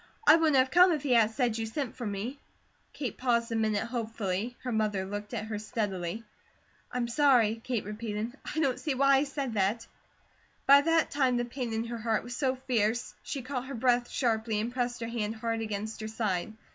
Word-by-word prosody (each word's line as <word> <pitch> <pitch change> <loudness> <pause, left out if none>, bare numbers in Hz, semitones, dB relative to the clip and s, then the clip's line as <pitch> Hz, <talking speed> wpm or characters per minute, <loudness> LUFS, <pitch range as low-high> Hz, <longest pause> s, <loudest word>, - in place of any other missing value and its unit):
I 305 - +9
wouldn't 320 -3 +3
have 260 0 +3
come 360 +3 +7
if 300 -3 -2
he 280 - -1
hadn't 225 -2 +4
said 240 -4 +1
you 225 - -2
sent 245 +2 -4
for 240 -4 -4
me." 210 +8 -4 0.5
Kate 270 -4 -5
paused 235 -2 +1
a - - -1
minute 215 -2 +1
hopefully. 225 -2 -3
Her 250 - -2
mother 210 -4 0
looked 205 +1 -6
at 220 -3 -3
her 215 -1 -4
steadily. 210 -2 -3 0.7
"I'm 245 -1 -1
sorry," 235 -4 +3
Kate 245 -6 -2
repeated. 215 +2 -4
"I - - -6
don't 270 -5 0
know 295 - +2
why 275 0 +5
he 285 - +1
said 275 -3 -3
that." 205 +2 0 0.8
By 280 +1 +8
that 330 +1 +2
time 260 -4 +2
the 240 - 0
pain 240 -1 -4
in 225 0 -1
her 235 0 -5
heart 225 -1 0
was 245 +1 -6
so 265 -1 +1
fierce 240 -3 0
she 275 - -5
caught 255 0 -4
her 275 - -5
breath 245 0 +2
sharply, 225 -3 0
and 230 +3 -3
pressed 245 -1 -2
her 230 - -2
hand 225 -2 -2
hard 225 0 -2
against 215 0 -4
her 215 - -4
side. 215 -4 -2
235 Hz, 210 wpm, -29 LUFS, 220-260 Hz, 0.8 s, I